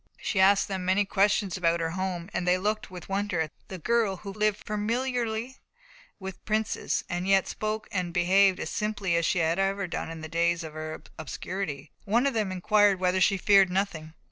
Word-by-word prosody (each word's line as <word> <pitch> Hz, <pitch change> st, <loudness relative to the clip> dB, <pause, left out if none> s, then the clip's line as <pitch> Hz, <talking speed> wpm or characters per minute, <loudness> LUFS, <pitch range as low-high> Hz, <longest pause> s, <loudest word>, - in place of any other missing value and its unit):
She 205 Hz, -, -2 dB
asked 195 Hz, +1 st, +5 dB
them 190 Hz, -2 st, -3 dB
many 190 Hz, +3 st, +2 dB
questions 200 Hz, -1 st, +1 dB
about 170 Hz, -1 st, +2 dB
her 165 Hz, -1 st, -1 dB
home, 180 Hz, -1 st, -3 dB
and 175 Hz, -, -2 dB
they 180 Hz, +1 st, +4 dB
looked 215 Hz, +5 st, -2 dB
with 180 Hz, -2 st, -9 dB
wonder 195 Hz, -2 st, -1 dB
at 155 Hz, -2 st, -1 dB, 0.2 s
the 190 Hz, -, -7 dB
girl 215 Hz, +1 st, +1 dB
who 195 Hz, +1 st, -8 dB
lived 210 Hz, 0 st, 0 dB
familiarly 235 Hz, +2 st, -2 dB, 0.6 s
with 190 Hz, -1 st, -8 dB
princes, 220 Hz, 0 st, -1 dB
and 175 Hz, +2 st, -3 dB
yet 195 Hz, -1 st, +4 dB
spoke 215 Hz, 0 st, -3 dB
and 180 Hz, -3 st, -2 dB
behaved 185 Hz, +2 st, +4 dB
as -, -, -4 dB
simply 210 Hz, -3 st, -2 dB
as -, -, +3 dB
ever 170 Hz, -, +1 dB
she 175 Hz, -, +1 dB, 0.5 s
had 180 Hz, -, -5 dB
done 160 Hz, -, -3 dB
in 165 Hz, -1 st, -7 dB
the 160 Hz, -, -6 dB
days 170 Hz, +1 st, +1 dB
of 160 Hz, -1 st, -8 dB
her 155 Hz, 0 st, -6 dB, 0.2 s
obscurity. 155 Hz, -3 st, -5 dB
One 230 Hz, +5 st, +2 dB
of 280 Hz, -, +1 dB
them 215 Hz, -4 st, 0 dB
inquired 200 Hz, +1 st, +3 dB
whether 185 Hz, 0 st, +1 dB
she 195 Hz, +1 st, +4 dB
feared 195 Hz, 0 st, +5 dB
nothing. 175 Hz, -4 st, -2 dB
190 Hz, 195 wpm, -27 LUFS, 175-210 Hz, 0.6 s, asked